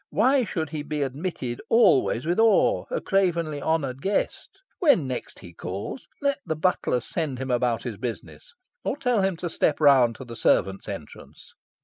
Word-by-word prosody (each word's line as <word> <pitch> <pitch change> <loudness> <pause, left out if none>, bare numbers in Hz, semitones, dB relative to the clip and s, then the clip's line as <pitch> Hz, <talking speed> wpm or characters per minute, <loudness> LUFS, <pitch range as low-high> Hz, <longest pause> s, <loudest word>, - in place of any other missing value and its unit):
Why 260 +2 +3
should 160 -6 -3
he 155 -2 -3
be 150 0 -2
admitted 135 -3 -4
always 135 - +4
with 175 +5 0
awe, 225 - +4
a - - -1
cravenly 170 -6 0
honoured 140 -5 -1
guest? 195 +5 -1 0.3
When 280 - +4
next 130 -1 -5
he 85 -5 -12
calls, 95 - -6 0.2
let 280 0 +1
the 160 - -2
butler 155 -6 +1
send 150 0 -3
him 130 0 -4
about 120 -1 +1
his 120 -5 -5
business, 130 - -7 0.3
or - - -2
tell 245 -6 +1
him 190 -2 0
to 175 - -4
step 155 -2 0
round 135 -6 +5
to 130 - -9
the 115 -1 -9
servants' 95 -3 +1
entrance. - - -10
155 Hz, 170 wpm, -25 LUFS, 125-195 Hz, 0.3 s, round